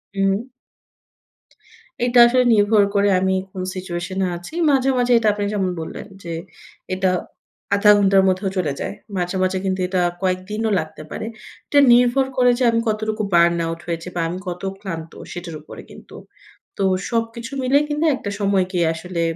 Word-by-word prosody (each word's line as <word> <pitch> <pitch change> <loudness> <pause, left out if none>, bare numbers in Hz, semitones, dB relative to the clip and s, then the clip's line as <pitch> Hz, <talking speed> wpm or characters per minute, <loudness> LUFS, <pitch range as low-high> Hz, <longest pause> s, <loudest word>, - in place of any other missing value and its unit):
উম 195 +5 0 1.6
এটা 245 0 +3
আসলে 250 +1 +3
নির্ভর 205 0 +4
করে 200 0 +3
আমি 190 0 +1 0.2
কোন 185 - -6
সিচুয়েশন 185 0 -5
এ - - 0
আছি। 175 - -11 0.2
মাঝে, 270 -2 +3
মাঝে 245 0 +1
এটা 225 - +1
আপনি 205 0 -2
যেমন 190 -3 0
বললেন 160 - -7 0.2
যে, 170 - -5 0.6
এটা 190 0 +1 0.7
০.৫ 210 +1 +6
ঘন্টার 195 -1 +4
মধ্যেও 190 +1 0
চলে 155 -6 0
যায়। - - -4 0.2
মাঝে, 180 +1 -2
মাঝে 185 0 0
কিন্তু 190 0 -1
এটা 185 -1 0 0.2
কয়েকদিনও 195 +4 -1
লাগতে 155 0 -7
পারে। - - -5 0.4
এটা 290 - +4
নির্ভর 245 +2 +4
করে 250 -1 +5
যে - - +1
আমি 230 - +1
কতটুকু 215 0 -1
বার্ন 170 0 +4
আউট 165 0 -4
হয়েছি 165 0 -4
বা 170 - 0
আমি 180 - -4
কত 175 0 -5 0.2
ক্লান্ত 165 -4 -6 0.2
সেটার 175 -2 -7
উপরে - - -11
কিন্তু। - - -14 0.6
তো 200 - -1 0.3
সবকিছু 230 +2 -3
মিলেই 275 +3 +3
কিন্তু 300 +2 0
একটা 205 - -6
সময় 195 -2 +2
গিয়ে 175 -3 +1
আসলে 170 +1 -5
195 Hz, 165 wpm, -21 LUFS, 180-225 Hz, 1.6 s, ০.৫